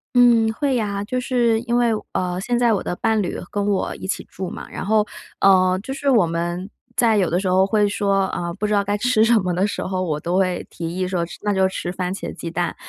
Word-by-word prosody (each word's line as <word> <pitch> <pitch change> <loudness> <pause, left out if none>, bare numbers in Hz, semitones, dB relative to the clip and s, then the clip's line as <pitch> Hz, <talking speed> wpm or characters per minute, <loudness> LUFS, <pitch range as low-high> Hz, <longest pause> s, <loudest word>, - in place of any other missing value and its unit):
嗯， 235 -2 +5
会 280 +2 0
呀。 205 -4 -1
就 255 +4 -2
是 240 -3 +1
因 240 0 -1
为， 240 -1 +3 0.2
呃， 180 0 -1
现 240 +5 0
在 240 -1 +3
我 200 - 0
的 175 - -3
伴 220 +1 +1
侣 180 - -3
跟 205 -1 -1
我 200 -2 0
一 - - -7
起 190 - -3
住 190 -1 -6
嘛， - - -8
然 - - -5
后， 215 +1 +2 0.3
呃， 185 -1 +5
就 265 - -5
是 280 +1 -3
我 230 -10 +5
们 175 +3 -3 0.3
在 230 -3 +3
有 185 -4 +2
的 175 - +1
时 190 - -3
候 185 +1 +4
会 210 0 +2
说， 200 -1 +1
呃， 175 -2 -3
不 200 +3 -2
知 210 - -1
道 205 -1 +3
该 205 +1 -1
吃 245 -1 +2
什 230 0 +5
么 180 -3 -1
的 185 +3 +1
时 205 - -4
候， 185 0 -2
我 155 -5 -1
都 170 +4 -2
会 185 -2 0
提 165 -1 -5
议 185 0 0
说： 180 -2 -1
“吃 - - -11
那 205 0 0
就 190 0 +3
吃 175 -1 -4
番 180 0 -3
茄 - - -6
鸡 170 - -6
蛋。” 175 0 -2
195 Hz, 275 characters per minute, -21 LUFS, 180-225 Hz, 0.3 s, 嗯